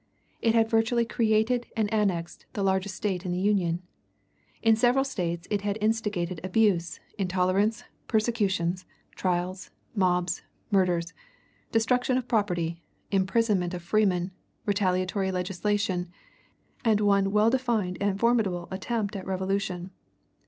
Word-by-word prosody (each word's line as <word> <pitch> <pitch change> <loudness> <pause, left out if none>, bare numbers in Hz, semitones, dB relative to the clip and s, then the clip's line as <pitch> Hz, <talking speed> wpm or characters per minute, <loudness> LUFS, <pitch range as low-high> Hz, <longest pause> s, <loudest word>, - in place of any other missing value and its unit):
It 230 0 +3
had 225 -1 +4
virtually 230 +1 +2
created 230 +1 +1
and 220 -2 +2
annexed 185 -6 -1
the 200 - -2
largest 190 0 0
State 190 -3 -2
in 180 - -3
the 175 - -1
Union. 185 -4 +1 0.8
In 225 -1 +6
several 245 +4 +3
States 175 -9 -3
it 205 -2 +1
had 205 0 -1
instigated 210 -6 -1
abuse, 185 -5 +1 0.2
intolerance, 190 +3 +1 0.2
persecutions, 195 -6 0 0.3
trials, 185 +1 -2 0.3
mobs, 180 -3 +1 0.3
murders, 180 -4 +2 0.6
destruction 250 +3 +2
of 250 -1 -3
property, 175 -6 0 0.3
imprisonment 195 -2 +1
of 175 - -7
freemen, 185 -2 +1 0.3
retaliatory 190 -1 +1
legislation, 185 0 -1 0.7
and 220 -4 +3
one 200 -1 +3
well 210 +2 +4
defined 235 -8 0
and 200 -1 0
formidable 210 -7 +1
attempt 205 +2 -2
at 190 -1 -6
revolution. 190 -1 -2
195 Hz, 120 wpm, -27 LUFS, 180-220 Hz, 0.8 s, In